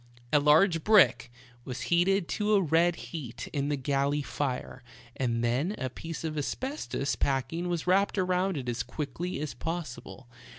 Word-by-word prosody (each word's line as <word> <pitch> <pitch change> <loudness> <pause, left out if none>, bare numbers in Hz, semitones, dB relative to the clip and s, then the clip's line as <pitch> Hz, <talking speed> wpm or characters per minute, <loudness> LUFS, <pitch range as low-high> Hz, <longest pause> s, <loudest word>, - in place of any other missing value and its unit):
A 150 - +6
large 160 +3 +4
brick 130 - +5 0.3
was 125 -1 -6
heated 175 +1 +2
to 210 0 +1
a 200 - +4
red 165 +2 +3
heat 140 -10 -7
in 140 -1 -1
the 145 - +1
galley 140 +2 0
fire, 130 -2 -3 0.3
and 120 -3 -1
then 135 - 0
a 130 -2 -3
piece 165 +4 -7
of 160 -1 -3
asbestos 255 - -2
packing 140 +6 -1
was 170 -2 -2
wrapped 195 +3 +2
around 185 -1 +1
it 130 -3 -5
as 120 +1 -1
quickly 145 +6 -4
as 150 -1 -4
possible. 160 -6 -6
150 Hz, 160 wpm, -29 LUFS, 130-180 Hz, 0.3 s, A